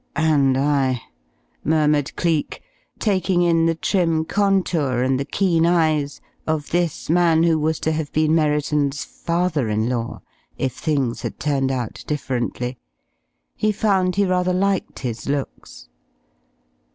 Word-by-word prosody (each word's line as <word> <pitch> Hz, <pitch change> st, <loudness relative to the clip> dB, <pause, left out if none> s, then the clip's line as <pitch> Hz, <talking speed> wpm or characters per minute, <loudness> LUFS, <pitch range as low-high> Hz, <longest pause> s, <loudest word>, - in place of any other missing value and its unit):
"And 145 Hz, -5 st, +3 dB
I," 135 Hz, -3 st, +1 dB, 0.6 s
murmured 150 Hz, -2 st, +1 dB
Cleek, 165 Hz, -4 st, -1 dB, 0.3 s
taking 185 Hz, -4 st, +1 dB
in 165 Hz, -1 st, +3 dB
the 165 Hz, -, +1 dB
trim 165 Hz, -2 st, +1 dB
contour 175 Hz, -11 st, +1 dB
and 130 Hz, 0 st, +1 dB
the 140 Hz, -, -2 dB
keen 170 Hz, -2 st, +1 dB
eyes 155 Hz, -4 st, +1 dB, 0.3 s
of 155 Hz, -2 st, -2 dB
this 175 Hz, -3 st, -1 dB
man 165 Hz, -1 st, +3 dB
who 165 Hz, -2 st, +3 dB
was 155 Hz, +1 st, 0 dB
to 160 Hz, -, 0 dB
have 155 Hz, -2 st, -3 dB
been 155 Hz, 0 st, +2 dB
Merriton's 150 Hz, -2 st, +1 dB
father 170 Hz, -7 st, -1 dB
in 110 Hz, +1 st, 0 dB
law 115 Hz, -2 st, -3 dB, 0.3 s
if 130 Hz, -2 st, -1 dB
things 135 Hz, -5 st, -1 dB
had -, -, -5 dB
turned 135 Hz, -3 st, 0 dB
out 125 Hz, -4 st, -4 dB
differently. 125 Hz, -3 st, -3 dB, 0.8 s
He 215 Hz, -, +1 dB
found 195 Hz, -4 st, +1 dB
he 200 Hz, 0 st, +3 dB
rather 180 Hz, 0 st, +1 dB
liked 195 Hz, +1 st, 0 dB
his 120 Hz, 0 st, -5 dB
looks. 95 Hz, -, -5 dB
155 Hz, 135 wpm, -21 LUFS, 135-175 Hz, 0.8 s, And